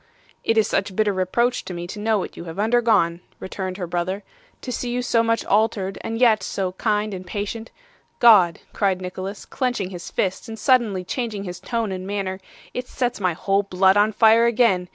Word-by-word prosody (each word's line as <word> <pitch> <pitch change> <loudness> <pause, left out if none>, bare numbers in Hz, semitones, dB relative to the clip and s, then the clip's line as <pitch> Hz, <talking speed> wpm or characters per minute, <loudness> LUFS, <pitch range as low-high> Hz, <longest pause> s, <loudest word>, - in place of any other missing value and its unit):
'It 225 - +1
is 220 - +4
such 195 0 -1
bitter 210 -1 +2
reproach 235 +7 0
to 180 - -7
me 175 0 -5
to 195 +4 -7
know 220 +1 +1
what 190 - -5
you 170 - -8
have 165 +1 -8
undergone,' 215 -6 +2 0.2
returned 190 -1 -5
her 185 - -3
brother; 180 +3 -2 0.4
'to 255 - -5
see 245 0 -3
you 245 +1 -1
so 240 -2 +2
much 230 0 0
altered, 200 -2 +1
and 225 - -4
yet 230 -4 +5
so 190 -2 -2
kind 210 +2 -1
and 185 -1 -7
patient 210 +4 -4 0.5
God!' 205 -8 +6
cried 195 -3 +1
Nicholas, 185 +2 -6
clenching 245 -8 -2
his 175 -2 -7
fist 190 +5 -2
and 225 - -6
suddenly 225 -7 +2
changing 215 0 -3
his 180 -2 -6
tone 225 +1 -2
and 185 0 -5
manner, 195 -2 -3 0.3
'it 250 0 -4
sets 245 -3 -2
my 185 -3 +1
whole 195 +4 +1
blood 190 -1 +3
on 205 +1 +4
fire 225 +2 +5
again. 215 -7 +2
205 Hz, 195 wpm, -22 LUFS, 185-225 Hz, 0.5 s, God